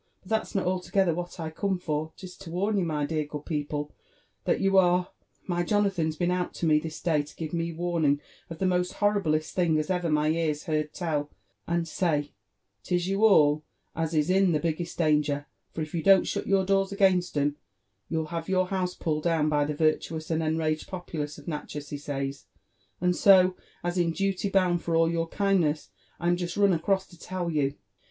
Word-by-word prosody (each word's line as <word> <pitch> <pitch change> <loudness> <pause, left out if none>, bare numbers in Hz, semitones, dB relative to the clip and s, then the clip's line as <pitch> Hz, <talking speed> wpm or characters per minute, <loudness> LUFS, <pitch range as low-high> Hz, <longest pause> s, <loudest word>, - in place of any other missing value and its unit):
«^ - - -46 0.2
But 185 - -15
that's 220 -1 -1
not 195 - +1
altogether 185 0 +1
what 175 +2 -6
I 160 -1 -4
come 190 +3 -1
for: 155 -2 -3
'tis 185 -1 -10
to 195 -4 -10
warn 195 +5 0
you, 180 - 0 0.2
dear 155 0 -1
good 150 0 -7
peoplOf 150 -2 -3 0.5
that - - +2
you 195 0 +2
are 180 0 +2 0.3
My 175 -2 -1
Jonathan's 185 -4 +1
been 175 +2 0
out 180 0 -2
to - - -2
me 155 -1 +4
this 155 0 -6
day, 155 -4 +2
to 145 - -12
give 160 -1 -5
me 170 0 -1
warning 165 -4 +1 0.3
of 165 - -7
the 190 - -1
most 180 0 +1
horriblest 195 -7 +1
thing 170 -4 +2
as 155 +4 -1
ever 180 -2 0
my 150 0 +2
ears 155 -2 0
heard 155 -1 -1
tell, 150 -5 -2 0.4
and 170 0 0
says 155 -4 0 0.5
'tis 175 -1 -1
you 195 +2 0
all 155 -8 +5 0.3
as 160 0 -1
is 155 +3 +2
in 190 -2 +4
the 155 - +2
biggest 170 +2 -3
danger; 150 -3 +1 0.3
for - - -5
if 155 -1 -5
you 170 - -1
don't 195 +2 +6
shut - - -2
youf 195 -1 +3
doors 195 0 +2
against 190 -5 +2
'em, 145 0 +1 0.5
you'll 160 -1 -1
have 165 0 -4
your 185 -1 +2
house 185 -2 -1
pulled 155 -1 -2
down 160 -3 +2
by 150 -1 +2
the 150 0 -3
vir<^ 155 +1 +3
tuous 160 0 -6
and 160 0 +1
enraged 155 0 -1
populace 160 -5 -5
of 145 - -14
Natchez, 150 -2 -5
he 145 - -3
says: 140 -1 -4 0.5
and 180 0 +2
so, 185 -2 +6 0.3
as 175 +1 -1
io 170 -1 +2
duly 195 +3 -1
bound 180 -3 +2
for 165 - -1
all 165 0 +4
your 165 0 -1
kindness, 165 - +1 0.3
I'm 175 0 +1
just 175 +1 -4
run 200 -2 +4
across 190 +3 +1
to 175 - -18
tell 180 -1 -3
you." 145 -2 0
170 Hz, 205 wpm, -27 LUFS, 155-185 Hz, 0.5 s, don't